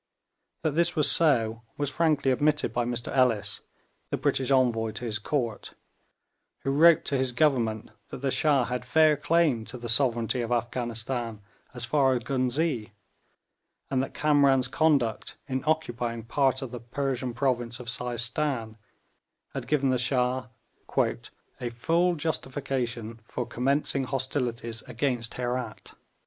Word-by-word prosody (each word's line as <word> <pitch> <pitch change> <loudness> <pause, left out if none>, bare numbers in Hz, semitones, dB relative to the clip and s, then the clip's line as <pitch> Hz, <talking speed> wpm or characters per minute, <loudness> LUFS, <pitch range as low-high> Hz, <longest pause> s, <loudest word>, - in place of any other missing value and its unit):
That 155 - +2
this 170 +3 +1
was 150 -3 +4
so 115 -8 +2 0.2
was 145 -1 -1
frankly 150 -5 +2
admitted 145 -2 +1
by 120 0 0
Mr 120 +1 -3
Ellis, 110 -6 +2 0.5
the - - -1
British 130 0 0
envoy 120 -4 +3
to 120 - -6
his 110 -2 -2
Court, 120 -1 -3 0.9
who 135 - -1
wrote 160 +3 +6
to 140 - 0
his 130 -1 0
Government 120 -7 +1 0.2
that 130 - -8
the 135 - +1
Shah 145 -3 +3
had 125 0 -3
fair 155 +4 +4
claim 150 -5 +2
to 125 - -8
the 120 -1 -6
sovereignty 120 0 +1
of 115 0 -3
Afghanistan 120 -1 -2 0.4
as 120 -1 -2
far 135 0 +3
as 120 - -2
Ghuznee, 125 -2 -1 1.0
and 130 -1 +2
that 135 - -5
Kamran's 140 -4 +4
conduct 135 -6 +1
in 130 -1 -2
occupying 120 -7 -1
part 130 +2 +1
of 130 - -6
the 125 - -6
Persian 125 0 -3
province 120 -2 -1
of 125 - -9
Seistan 120 0 -2 0.8
had - - -5
given 140 -3 +2
the 130 - +1
Shah 125 0 0 0.5
'a 120 - -2
full 170 +9 +1
justification 130 -7 -3
for 120 +3 -4
commencing 135 +2 0
hostilities 125 -4 -2
against 125 -2 -1
Herat.' 125 -3 -4
125 Hz, 140 wpm, -27 LUFS, 120-140 Hz, 1.0 s, wrote